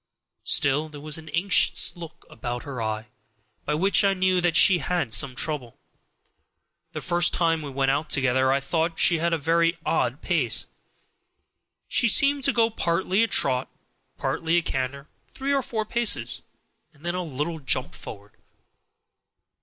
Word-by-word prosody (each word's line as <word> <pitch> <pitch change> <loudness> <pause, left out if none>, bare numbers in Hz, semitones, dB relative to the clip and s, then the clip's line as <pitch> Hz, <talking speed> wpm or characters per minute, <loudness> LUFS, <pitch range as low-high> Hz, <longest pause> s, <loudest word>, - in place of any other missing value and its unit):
Still, 145 +3 +2
there 150 -1 -11
was 150 +1 -3
an 160 0 -12
anxious 185 +3 +3
look 165 -2 -11
about 120 +1 -6
her 135 -4 -6
eye, 110 0 -3 0.6
by 150 - -1
which 195 +6 +3
I 195 -1 +2
knew 185 -1 +1
that 175 -2 +1
she 180 0 +6
had 165 -5 -2
some 125 +4 +3
trouble. 135 -5 -3 1.2
The - - -5
first 175 0 +2
time 165 -2 +1
we 145 - -7
went 135 0 0
out 150 +3 -2
together 130 0 +2
I 135 +1 +1
thought 165 +3 -2
she 170 -2 +4
had 170 +1 0
a 165 - +1
very 165 +2 +1
odd 130 -3 -1
pace; 150 - 0 1.2
she 235 - +2
seemed 280 +4 +4
to 275 - +3
go 230 -2 +2
partly 185 +1 0
a 230 - +3
trot, 130 - +1 0.5
partly 165 +1 -1
a 170 - +1
canter, 135 +1 -4 0.2
three 275 +1 -3
or 275 - +2
four 220 -3 -3
paces, 235 +1 -1 0.5
and 150 +1 -19
then 175 - -1
a 180 - -2
little 155 +2 -4
jump 130 -2 -2
forward. 100 -1 -11
160 Hz, 160 wpm, -24 LUFS, 135-180 Hz, 1.2 s, she